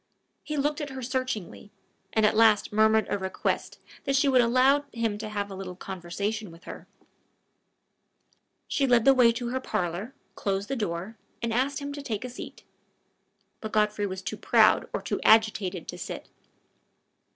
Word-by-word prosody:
He 300 -1 -5
looked 295 +2 0
at 290 - -4
her 265 -1 -7
searchingly, 255 -6 -4 0.4
and 220 -1 +3
at 210 - +3
last 220 -2 +4
murmured 220 0 +4
a 205 - -1
request 190 0 -2 0.3
that 275 -1 +1
she 275 +2 +3
would 260 -2 +5
allow 255 +4 +4
him 225 -3 -2
to 215 0 -5
have 205 -1 -3
a - - -6
little 185 -1 -7
conversation 195 +4 -4
with 165 +1 -15
her. - - -9 1.8
She 275 -2 +1
led 240 -3 +4
the 270 - +8
way 245 -3 +5
to 235 0 -4
her 260 +2 -1
parlor, 200 0 -3 0.2
closed 195 +1 -2
the 270 - -1
door, 205 -1 -4 0.3
and 230 -1 -1
asked 270 +4 +1
him 285 0 -5
to 285 - -6
take 230 -3 -4
a 250 - -6
seat. 245 - -9 1.0
But 220 - -7
Godfrey 210 -1 +1
was 190 0 -6
too 185 - -4
proud - - +4
or - - -3
too - - -2
agitated 215 -5 +3
to - - -6
sit. - - -6
220 Hz, 175 wpm, -27 LUFS, 200-255 Hz, 1.8 s, the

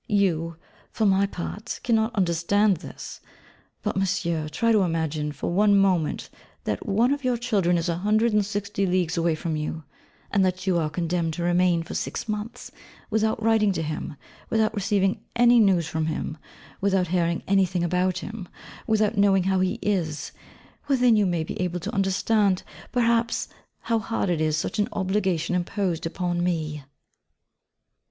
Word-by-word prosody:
You, 170 -6 +1 0.3
for 220 - -1
your 195 0 +3
part, 205 +5 -6
cannot 225 0 +1
understand 190 +2 +2
this! 165 - -9 0.6
But, 210 - -1
Monsieur, 170 -5 -1
try 230 +9 +1
to 215 -2 +4
imagine, 160 -4 -1
for 150 - -4
one 205 +2 +4
moment, 185 -5 +1 0.3
that - - -3
one 230 +6 +3
of 285 -1 -5
your 250 -1 +1
children 200 -8 +1
is 165 +1 -1
a 170 -1 0
hundred 215 +4 +2
and 210 -1 +3
sixty 200 -1 -2
leagues 180 -2 +1
away 165 -1 +1
from 160 0 -3
you; 155 +1 -4 0.5
and 200 -1 +3
that 185 0 -1
you 180 -3 +2
are 155 -2 0
condemned 165 0 -1
to 170 - -3
remain 175 -1 +2
for - - -8
six - - -3
months, 215 +1 -5 0.4
without 220 0 +1
writing 220 -2 +3
to 165 - -2
him; 155 -1 -4 0.3
without 220 -1 +2
receiving 200 -1 0
any 240 0 +6
news 190 -6 +3
from 160 -1 -2
him; 155 -1 -3 0.5
without 190 -3 +1
hearing 170 -1 0
anything 190 -2 +2
about 180 +1 +1
him; 205 -3 -6 0.4
without 215 -1 +2
knowing 195 -2 +4
how 190 0 +1
he 185 0 0
is; 170 -7 -1 0.6
well, 275 -2 +3
then 245 -2 +5
you 210 -2 +3
may 175 -3 0
be 160 - -5
able 180 -1 -1
to 205 +7 -5
understand, 200 0 +1 0.3
perhaps, 235 -1 +1 0.3
how 230 -1 0
hard 220 -4 -1
is 155 -2 +1
such 160 - -2
an 205 - +1
obligation 190 -4 0
imposed 180 -2 -1
upon 175 0 -2
me. 155 -4 -2
190 Hz, 165 wpm, -25 LUFS, 170-210 Hz, 0.6 s, any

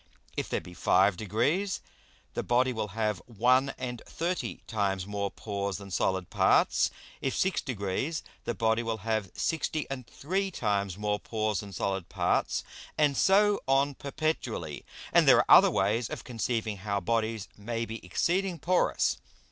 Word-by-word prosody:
If - - -3
there - - 0
be 90 - -11
five 95 +2 +3
degrees, 125 - 0 0.5
the - - -1
Body 125 +1 +2
will 110 -2 -2
have 105 -5 0
one 125 +4 +3
and 125 -2 -5
thirty 175 +2 -3
times 100 -4 -1
more 100 0 -2
Pores 100 -2 -3
than 100 -1 -10
solid 95 0 0
Parts. - - +4 0.3
If 135 - -1
six 190 0 +1
degrees, 125 - -2 0.2
the 120 - -2
Body 110 0 +2
will 115 -1 -2
have 110 -4 0
sixty 160 -1 -1
and 130 -3 -5
three 195 +6 -2
times 100 - -1
more 105 0 -1
Pores 110 -3 -1
than 100 +1 -7
solid 95 -1 -2
Parts. - - 0 0.3
And 150 -2 +3
so 205 +4 +4
on 135 +1 +3
perpetually. 135 - -3 0.3
And - - +5
there - - +8
are - - +4
other - - +6
ways 105 +4 +1
of - - -6
conceiving 115 -3 -2
how 100 +1 -2
Bodies 110 +1 -1
may 115 +2 -3
be 115 0 -7
exceeding 175 - 0
porous. 180 +4 +1
115 Hz, 155 wpm, -29 LUFS, 100-135 Hz, 0.5 s, there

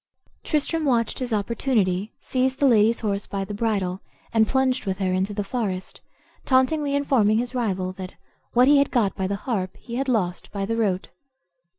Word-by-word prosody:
Tristram 315 +1 0
watched 240 -6 +1
his 250 -2 -3
opportunity, 210 -2 0
seized 260 0 0
the 285 - +2
lady's 230 -2 +4
horse 200 -2 -2
by 195 -1 -3
the 205 - -6
bridle, 200 -4 -1 0.3
and 220 -1 +4
plunged 260 -3 +1
with 190 -1 -1
her 190 -2 0
into 190 +2 0
the 205 0 -2
forest, 195 -4 -4 0.4
tauntingly 280 +2 +2
informing 240 -7 +3
his 245 +2 -2
rival 190 -7 -1
that 185 -1 -8 0.4
"what 245 +2 +5
he 285 0 +6
had 280 - +2
got 220 -6 +1
by 190 - -1
the 200 - -1
harp 190 -8 -2
he 235 0 -7
had 270 0 -1
lost 185 -7 -1
by 200 -1 -2
the 230 +3 -1
rote." 200 -5 0
220 Hz, 185 wpm, -24 LUFS, 195-255 Hz, 0.4 s, he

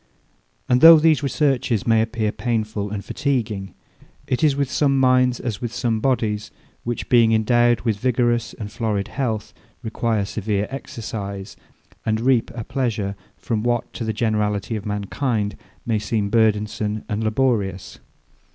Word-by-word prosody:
And 125 0 +3
though 165 0 +11
these 155 -1 +3
researches 135 -6 0
may 115 -1 +4
appear 110 -1 -1
painful 110 -4 -2
and 100 -1 -5
fatiguing, 110 -8 -2 0.5
it 130 +5 -1
is 150 -3 +4
with 140 -1 0
some 140 -2 +2
minds 125 -1 +3
as 115 -6 -4
with 120 -2 -3
some 115 -2 -1
bodies, 110 -4 0 0.3
which 120 0 -4
being 115 -2 +5
endowed 120 +1 +3
with 110 -4 -1
vigorous 120 -1 0
and 105 -2 -7
florid 105 -3 -2
health, 115 -6 -3 0.3
require 110 -2 -1
severe 105 0 -2
exercise, 100 -7 -6 0.5
and 110 0 0
reap 125 -1 +2
a 115 - -4
pleasure 110 -6 -2 0.2
from 110 -3 -2
what, 120 0 -1
to - - -5
the 110 - -1
generality 105 -1 -1
of 105 -1 -5
mankind, 105 +1 -2 0.3
may 115 -2 +1
seem 105 -1 -1
burdensome 105 -1 +1
and 105 +1 -2
laborious. 110 -5 -1
115 Hz, 145 wpm, -22 LUFS, 105-125 Hz, 0.5 s, though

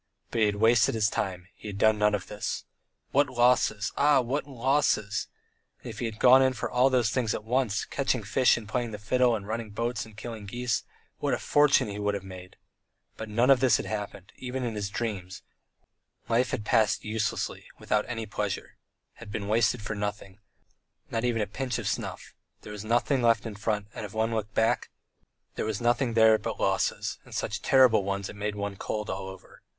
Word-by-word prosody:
But 115 - -1
he 110 - +5
had 105 - 0
wasted 110 +1 +4
his 110 -1 +2
time, 90 -3 -3
he - - -11
had 100 -1 -5
done 110 +1 +3
nothing 105 0 +3
of 100 - -5
this. 105 - -4 0.5
What 145 0 +3
losses! 120 -4 +2
Ah! 145 -1 +4
What 130 +4 -2
losses! 130 -5 +1 0.6
And 120 - -6
if 110 - -10
he 120 - -2
had 110 -2 -4
gone 130 +3 +7
in 130 0 +3
for 115 - -4
all 125 +2 +4
those 125 -4 +2
things 120 -3 0
at - - -5
once 115 -2 0
catching 130 -4 -1
fish 110 +6 +3
and 110 -3 -8
playing 120 +2 -1
the - - -4
fiddle, 120 +3 +2
and 100 -2 -6
running 110 0 -3
boats 115 +2 -2
and 110 -2 -14
killing 110 -3 -7
geese 120 0 -2 0.3
what - - +1
a - - -4
fortune 145 -5 +3
he 105 0 -5
would 105 0 0
have 100 - -5
made! 95 -1 -10 0.6
But 110 - -7
nothing 120 +5 +3
of 135 - +6
this 130 -2 +4
had - - -5
happened, 100 -2 -5
even 130 0 -4
in 120 -2 -2
his 105 -2 -3
dreams; 100 -3 -4 0.8
life 120 +2 +2
had 105 - -3
passed 110 -1 +2
uselessly 105 0 -2
without 105 0 0
any 115 -2 -4
pleasure, 105 -1 -4 0.4
had 115 -3 -10
been 100 -1 -4
wasted 110 +1 +2
for 105 - -3
nothing, 105 -1 -5 0.7
not 115 0 -1
even 115 -3 +1
a - - -1
pinch 125 +5 -3
of - - -4
snuff; - - -4 0.3
there 105 - -8
was 105 -1 -7
nothing 120 +4 +1
left 115 -1 +3
in 115 - -5
front, 105 0 -2
and - - -6
if 105 0 -8
one 110 +1 0
looked 105 -2 -3
back 115 +2 +1 0.6
there - - -3
was 110 -2 -2
nothing 120 0 +1
there 110 -1 +6
but - - -5
losses, - - 0
and - - -11
such - - -2
terrible 130 -6 +5
ones, 100 0 -3
it - - -9
made 105 0 -3
one 100 -1 -4
cold 105 +1 -4
all 95 0 -4
over. 95 -1 -13
110 Hz, 210 wpm, -28 LUFS, 105-120 Hz, 0.8 s, gone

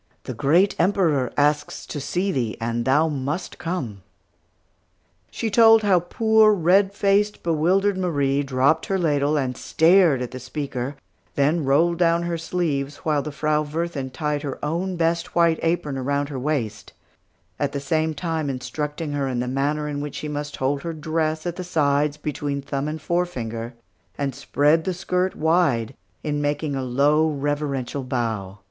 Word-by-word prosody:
The 130 - -5
great 160 - +3
Emperor 165 -8 +2
asks 150 +1 +1
to 150 - -5
see 180 +8 -1
thee, 120 -9 -2
and 115 0 -2
thou 150 +5 +3
must 145 +4 -4
come!" 135 - -4 1.3
She 225 - -3
told 225 0 +6
how 195 -3 +4
poor, 220 +4 +4
red 190 +2 +3
faced, 200 +1 +1
bewildered 185 +5 +2
Marie 145 -6 +1
dropped 140 +3 +1
her 195 - 0
ladle 150 -3 +1
and 130 -3 -1
stared 165 -5 +4
at 125 - -6
the 130 - -7
speaker, 135 0 -4 0.4
then 150 +2 +2
rolled 165 +5 +3
down 170 -1 +3
her 170 -1 -2
sleeves 150 -5 -2
while 150 -2 +2
the 150 - -5
Frau 150 +1 0
Wirthin 150 -2 -3
tied 150 +1 -2
her 140 -3 -4
own 175 +5 -2
best 170 0 -1
white 170 -1 +3
apron 165 -5 -1
around 140 +2 -1
her 135 -3 -4
waist, 115 -8 -3 0.7
at 145 -1 0
the 140 - -3
same 155 +3 0
time 160 -2 -2
instructing 150 +4 -4
her 140 -1 -1
in 125 -2 -2
the 125 - -2
manner 145 +3 -1
in 145 -1 -3
which 145 -1 -6
she 150 - -5
must 145 0 -4
hold 140 +2 -1
her 165 +2 -4
dress 155 0 -2
at 175 -1 -3
the 185 - -4
sides, 150 -3 +1
between 145 -1 -3
thumb 140 +1 -3
and 155 0 -5
forefinger, 120 -10 -2 0.4
and 140 -1 -2
spread 150 +6 +2
the 185 0 -2
skirt 180 +1 -1
wide, 160 -9 +1 0.3
in 145 -1 -1
making 145 0 -1
a 135 - -2
low, 145 +5 +2
reverential 140 -2 -2
bow. 115 -7 -3
150 Hz, 165 wpm, -23 LUFS, 140-170 Hz, 1.3 s, told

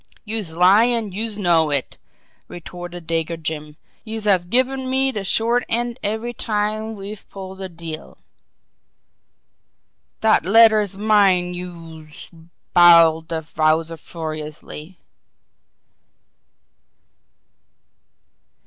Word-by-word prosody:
"Youse 210 -7 -2
lie, 190 +6 +6
an' 230 -4 -1
youse 215 +2 -3
knows 165 -6 +2
it!" 135 - -2 0.5
retorted 175 0 -9
Dago 165 0 -2
Jim. 150 -1 -5 0.3
"Youse 220 -1 -6
have 185 -4 +1
given 260 +3 0
me 265 +1 +1
de 210 -5 -5
short 230 +5 +1
end 240 +1 -2
every 220 +3 -3
time 215 0 -2
we've 200 +1 -9
pulled 190 0 -9
a 190 - -5
deal!" 165 -2 -8 2.0
"Dat 220 -6 +3
letter's 215 0 +4
mine, 195 -4 +2
youse 165 -3 -10 0.2
" - - -51
bawled 165 -2 +6
the 160 -1 -5
Wowzer 160 +1 +1
furiously. 155 +1 -8
185 Hz, 100 wpm, -20 LUFS, 165-220 Hz, 2.0 s, lie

